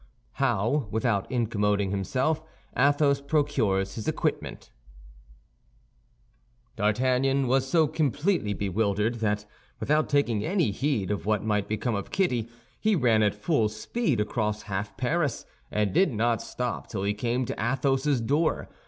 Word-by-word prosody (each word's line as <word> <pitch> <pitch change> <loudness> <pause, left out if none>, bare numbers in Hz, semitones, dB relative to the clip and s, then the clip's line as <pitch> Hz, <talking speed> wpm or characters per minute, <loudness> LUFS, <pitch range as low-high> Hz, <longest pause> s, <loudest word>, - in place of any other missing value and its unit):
HOW, 120 +1 +1
WITHOUT 110 -2 0
INCOMMDING 105 -5 +1
HIMSELF, 130 - 0 0.3
ATHOS 140 +1 +3
PROCURES 135 -10 +1
HIS 110 - -6
EQUIPMENT - - -2 2.0
D'Artagnan 130 +5 +2
was 130 +1 +1
so 160 +2 +4
completely 150 - 0
bewildered 105 +3 0
that 105 -1 0 0.3
without 150 +2 +1
taking 120 -8 +1
any 170 - +1
heed 110 -4 -1
of 100 0 -3
what 105 -2 +1
might 105 -2 0
become 110 +3 -1
of 100 -2 -3
Kitty 125 - 0 0.3
he 215 -1 +2
ran 120 -8 +3
at 105 -1 +2
full 110 0 +1
speed 125 - -1
across 105 0 -1
half 100 0 -4
Paris, 145 +2 0 0.2
and 105 -3 0
did 190 -5 +4
not 115 0 +1
stop 125 -1 -4
till 100 -3 -4
he 100 +1 +1
came 120 +4 -1
to - - -4
Athos's 135 +2 +1
door. 145 +8 0
120 Hz, 135 wpm, -27 LUFS, 105-140 Hz, 2.0 s, so